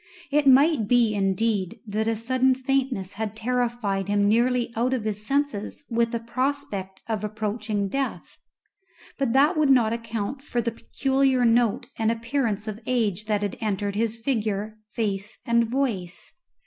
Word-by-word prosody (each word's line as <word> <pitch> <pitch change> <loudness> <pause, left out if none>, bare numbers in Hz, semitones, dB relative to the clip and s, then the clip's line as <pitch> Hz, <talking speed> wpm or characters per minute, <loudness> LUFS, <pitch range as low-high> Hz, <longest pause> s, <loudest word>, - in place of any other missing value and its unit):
It 290 0 +3
might 270 -3 +5
be, 235 -2 +4
indeed, 195 -1 0
that 215 +1 -1
a 225 - +1
sudden 255 +3 +2
faintness 260 -7 -1
had 215 0 -4
terrified 230 -4 -1
him 205 0 +2
nearly 240 +2 +2
out 245 +3 +1
of 240 - -3
his 210 -1 -1
senses 275 -1 -1
with 230 0 +1
a - - 0
prospect 235 -5 -3
of 220 -2 -2
approaching 210 -1 -2
death; 270 +7 -4 0.8
but 270 -4 +1
that 290 +6 +4
would 305 -2 +3
not 235 -4 +4
account 230 +2 -4
for 245 -3 -3
the 235 0 0
peculiar 265 +2 +1
note 235 +1 +3
and 225 0 +2
appearance 230 -2 -1
of 215 0 -4
age 215 -5 0
that 210 -1 0
had 205 - -3
entered 205 -2 -1
his 225 +1 0
figure, 220 -3 -2 0.2
face, 210 -2 -2
and 235 0 +3
voice. 225 -9 -2
230 Hz, 155 wpm, -25 LUFS, 210-255 Hz, 0.8 s, might